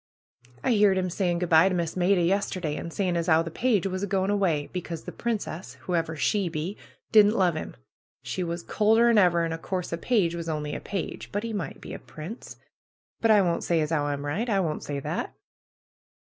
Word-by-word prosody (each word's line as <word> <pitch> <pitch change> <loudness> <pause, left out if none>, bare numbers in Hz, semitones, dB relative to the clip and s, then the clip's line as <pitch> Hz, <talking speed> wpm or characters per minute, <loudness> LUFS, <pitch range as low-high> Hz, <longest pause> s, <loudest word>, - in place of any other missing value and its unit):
"I - - +2
heerd 205 -4 +4
'im 185 -1 -1
saying 175 -1 0
good 175 0 -2
by 165 +3 +6
to 185 - -1
Miss 170 -2 -2
Maida 180 0 +3
yester 190 +1 0
day, 155 -4 -2
and 170 - -5
saying 180 -1 -1
as 170 0 -1
'ow 160 0 +5
the 165 - -6
page 225 -2 +1
was 185 -1 -2
a 200 - -1
going 195 0 +1
away, 175 -8 +1
becos 175 -3 -5
the - - -5
princess, 210 -7 -4
whoever 165 -3 -1
she 190 +5 +1
be, 165 +5 -4 0.4
didn't 215 0 +6
love 180 -4 +3
'im; 155 - -5 0.5
she 185 - -3
was 170 0 -4
colder'n 225 +3 +4
ever, 170 -3 +4
an' 165 - -2
o' 165 - -5
course 180 0 -3
a 170 - -2
page 195 -6 +2
was 170 -1 -4
only 150 -1 -3
a - - -3
page, 195 -4 -5
but 205 - -1
PRUE'S 230 - -3
GARDENER 205 - -1
209 - - -3
he - - -12
might - - -20
be - - -8
a - - -6
prince. 155 - -9 0.6
But 225 - +2
I 210 -2 +7
won^t 175 -3 0
say 170 -2 +1
as 155 0 -1
'ow 150 -3 +1
I'm 145 0 -3
right. 200 +12 -2
I 200 -3 +2
won't 160 -5 -1
say 145 -1 -4
that!" - - -4
180 Hz, 235 wpm, -26 LUFS, 165-200 Hz, 0.6 s, I